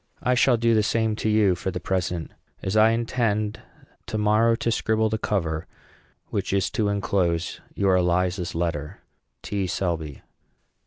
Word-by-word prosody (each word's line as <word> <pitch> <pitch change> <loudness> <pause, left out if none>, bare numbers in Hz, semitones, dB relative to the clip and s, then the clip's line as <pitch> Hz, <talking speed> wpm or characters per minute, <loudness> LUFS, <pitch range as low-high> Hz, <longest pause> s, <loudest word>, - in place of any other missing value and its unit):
I 125 - +3
shall 125 0 +4
do 115 0 +2
the 110 - +4
same 110 +1 +1
to 110 - -1
you 105 -3 +4
for 90 +2 -3
the 90 - -4
present, 90 -3 -2 0.3
as 95 +2 -2
I 110 +1 +6
intend, 115 -2 0 0.5
to 110 - -3
morrow, 110 +2 +3
to 115 - -1
scribble 110 0 +1
the 110 0 -2
cover, 80 -5 -1 0.6
which - - -2
is 100 -1 +1
to 105 - 0
enclose 95 -4 0
your 95 -2 +3
Eliza's 90 0 0
letter. 85 +1 -3 0.4
T. 100 -2 -2
SELBY. 85 -6 -3
100 Hz, 155 wpm, -24 LUFS, 90-110 Hz, 0.6 s, I